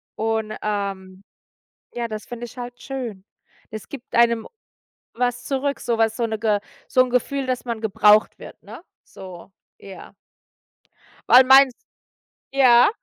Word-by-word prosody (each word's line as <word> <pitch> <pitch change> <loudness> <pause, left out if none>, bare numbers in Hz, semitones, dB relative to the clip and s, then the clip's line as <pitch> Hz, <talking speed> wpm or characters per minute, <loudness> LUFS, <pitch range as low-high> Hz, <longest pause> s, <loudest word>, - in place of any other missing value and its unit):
und, 220 -1 -2
ähm 195 -2 -4 0.7
ja, 235 -1 -3
das 215 -1 -7
finde 240 0 -7
ich 240 - -14
halt 245 0 -8
schön. 240 -8 -6 0.5
Es 215 -1 -9
gibt 265 -3 -9
einem 235 -1 +3 0.7
was 245 +1 -2
zurück, 280 +1 -2
sowas 225 -2 0
so 235 - -1
'ne 220 -1 -3
Ge 210 -2 0 0.3
so 255 - +4
'n 255 - -4
Gefühl, 265 +2 -1
dass 255 -1 -3
man 235 -3 -4
gebraucht 215 0 +3
wird, - - -13
ne, - - -12 0.2
so. 185 0 -12 0.3
Ja. 195 -1 -12 1.2
Weil 255 +1 +8
mein 265 0 +7 0.8
ja? 250 -3 +5
235 Hz, 140 wpm, -22 LUFS, 215-250 Hz, 1.2 s, Weil